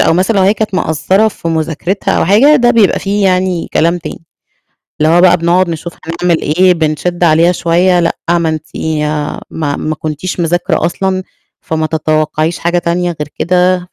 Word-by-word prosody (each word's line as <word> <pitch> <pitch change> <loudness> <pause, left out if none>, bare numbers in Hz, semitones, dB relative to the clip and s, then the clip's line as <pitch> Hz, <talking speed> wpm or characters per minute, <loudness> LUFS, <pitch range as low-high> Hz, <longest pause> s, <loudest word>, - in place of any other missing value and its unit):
أو - - +3
مثلًا، 190 +4 +1
لو 190 - +3
هي 200 +3 +3
كانت 215 -3 -3
مقصّرة 190 +6 +1
في 170 - -6
مذاكرِتها 165 +4 -1
أو - - +1
حاجة، 250 - +5
ده 240 -2 +3
بيبقى 215 -4 +3
فيه 200 +1 -1
يعني 185 -2 0
كلام 170 +2 +1
تاني. 165 0 -9 0.8
اللي 160 +2 +3
هو 175 - +4
بقى 180 -1 +5
بنقعد 170 +2 +1
نشوف 170 +1 -5
هنعمل 170 0 -1
إيه، 180 +5 +3
بنشِّد 165 +2 -2
عليها 165 +2 +4
شوية، 175 +1 +2
لأ، 165 - 0 0.2
ما 170 -2 +1
أنتِ 155 0 -4 0.8
ما 145 -3 -3
ما 155 0 -3
كُنتيش 155 +4 -5
مذاكرة 170 -1 0
أصلًا، 185 +2 -2 0.4
فما 160 -1 -2
تتوقعيش 155 +1 -1
حاجة 175 +1 0
تانية 175 0 -1
غير 150 - -4
كده، 180 +1 +2
175 Hz, 170 wpm, -13 LUFS, 160-185 Hz, 0.8 s, حاجة